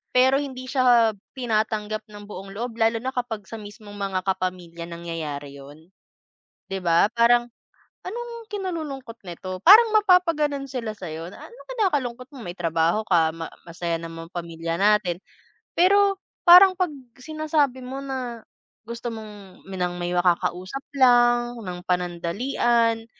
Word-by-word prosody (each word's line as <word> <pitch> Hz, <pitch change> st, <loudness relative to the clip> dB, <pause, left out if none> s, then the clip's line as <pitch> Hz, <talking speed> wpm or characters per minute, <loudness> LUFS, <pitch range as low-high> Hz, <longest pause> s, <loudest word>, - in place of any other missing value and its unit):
Pero 260 Hz, +2 st, +5 dB
hindi 260 Hz, -2 st, -6 dB
siya 245 Hz, -4 st, +4 dB, 0.2 s
tinatanggap 215 Hz, -2 st, -1 dB
ng 205 Hz, 0 st, -11 dB
buong 195 Hz, -1 st, -9 dB
loob, 230 Hz, +2 st, -5 dB
lalo 225 Hz, +1 st, +3 dB
na 260 Hz, +3 st, -4 dB
kapag 225 Hz, -5 st, -4 dB
sa 225 Hz, -, -9 dB
mismong 205 Hz, 0 st, -11 dB
mga 195 Hz, -2 st, -1 dB
kapamilya 180 Hz, -3 st, -3 dB
nangyayari 155 Hz, -4 st, -6 dB
'yon. 145 Hz, +5 st, -14 dB, 0.8 s
Di 195 Hz, -, -3 dB
ba, 170 Hz, 0 st, +4 dB
parang, 240 Hz, +1 st, +4 dB, 0.6 s
"Anong 465 Hz, +2 st, -6 dB
kinalulungkot 315 Hz, -, -5 dB
nito?" 185 Hz, +2 st, -6 dB
Parang 440 Hz, +5 st, +9 dB
mapapagano'n 335 Hz, -9 st, +3 dB
sila 235 Hz, -4 st, -4 dB
sa'yo 165 Hz, -3 st, -7 dB
na, -, -, -13 dB
"Anong 475 Hz, -, -15 dB
kinakalungkot 265 Hz, -, -1 dB
mo -, -, -10 dB
may 175 Hz, -, -5 dB
trabaho 165 Hz, +3 st, +1 dB
ka 165 Hz, -3 st, +3 dB
ma 165 Hz, -1 st, -6 dB, 0.2 s
masaya 170 Hz, 0 st, -3 dB
naman 165 Hz, 0 st, -8 dB
pamilya 165 Hz, -2 st, -4 dB
natin." 195 Hz, -3 st, +2 dB, 0.6 s
Pero 395 Hz, +2 st, +4 dB, 0.3 s
parang 370 Hz, +2 st, +9 dB
'pag 360 Hz, -3 st, +1 dB, 0.3 s
sinasabi 300 Hz, -2 st, -1 dB
mo 265 Hz, +2 st, -6 dB
na 250 Hz, -4 st, -5 dB, 0.4 s
gusto 235 Hz, 0 st, -5 dB
mong 210 Hz, -3 st, -11 dB
ng 180 Hz, -2 st, -2 dB
may 175 Hz, 0 st, -2 dB
makakausap 180 Hz, +6 st, 0 dB, 0.2 s
lang 240 Hz, -2 st, +4 dB
ng 180 Hz, -3 st, -6 dB
panandalian 225 Hz, +6 st, 0 dB
225 Hz, 135 wpm, -24 LUFS, 180-265 Hz, 0.8 s, Parang